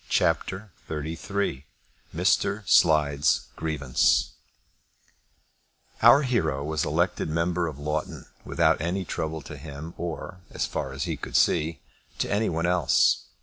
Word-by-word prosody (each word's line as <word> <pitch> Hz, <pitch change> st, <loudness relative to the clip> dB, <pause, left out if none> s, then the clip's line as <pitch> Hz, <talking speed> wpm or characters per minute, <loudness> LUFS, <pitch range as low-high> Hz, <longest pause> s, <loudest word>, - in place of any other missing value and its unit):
CHAPTER 95 Hz, +5 st, 0 dB, 0.2 s
XXXIII 80 Hz, 0 st, -3 dB, 0.5 s
Mr. 105 Hz, -1 st, +1 dB
Slide's 75 Hz, -3 st, +3 dB
Grievance 75 Hz, -5 st, +1 dB, 1.7 s
Our 145 Hz, -, +7 dB
hero 80 Hz, -, 0 dB
was 75 Hz, 0 st, -1 dB
elected 85 Hz, +2 st, 0 dB
member 85 Hz, +1 st, 0 dB
for 70 Hz, -, -13 dB
Loughton 75 Hz, +1 st, -3 dB, 0.2 s
without -, -, +2 dB
any 90 Hz, +3 st, -2 dB
trouble 80 Hz, -1 st, -4 dB
to 75 Hz, -, -9 dB
him 75 Hz, +3 st, -8 dB
or, 85 Hz, +1 st, -5 dB
as -, -, -2 dB
far 65 Hz, -, -4 dB
as 65 Hz, 0 st, -4 dB
he -, -, -3 dB
could -, -, -7 dB
see, 80 Hz, -1 st, +2 dB, 0.4 s
to -, -, -1 dB
any 105 Hz, +2 st, +1 dB
one 85 Hz, +1 st, -1 dB
else. 90 Hz, -1 st, +3 dB
80 Hz, 125 wpm, -26 LUFS, 75-90 Hz, 1.7 s, Our